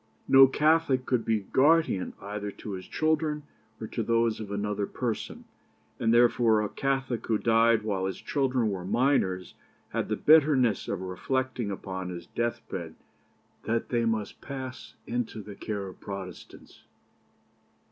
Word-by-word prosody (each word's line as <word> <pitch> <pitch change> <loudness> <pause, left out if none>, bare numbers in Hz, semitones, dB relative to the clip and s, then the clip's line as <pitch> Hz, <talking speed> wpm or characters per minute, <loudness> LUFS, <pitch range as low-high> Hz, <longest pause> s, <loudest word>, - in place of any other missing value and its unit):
No 135 0 +8
Catholic 150 -2 +2
could 125 -3 +1
be 110 -2 +1
guardian 145 - +2
either 105 +1 -5
to 105 +1 -8
his 95 -2 -6
own - - -27
children 155 -1 0 0.4
or - - -5
to - - -4
those 115 -1 +1
of 105 -2 -6
another 100 0 -2
person; 120 -3 -4 0.5
and 115 - +2
therefore 120 -2 +4
a 105 - -2
Catholic 135 -4 -2
who 110 - +2
died 115 0 +3
while 95 -3 -1
his 95 - -4
children 130 -6 0
were 95 -2 -4
minors 95 -5 +1 0.4
had - - -2
the - - +1
bitterness 140 -8 +4
of 100 -2 -3
reflecting 125 +5 -2
upon 95 -2 -5
his 85 -1 -7
death 120 +4 -3
bed - - -6 0.7
that 115 +1 -1
they 120 -1 +1
must 110 -2 -2
pass 130 -2 -7
into 120 -2 -3
the 105 0 -8
care 100 0 -4
of 95 - -10
Protestants. 95 -2 -9
115 Hz, 150 wpm, -28 LUFS, 100-130 Hz, 0.7 s, No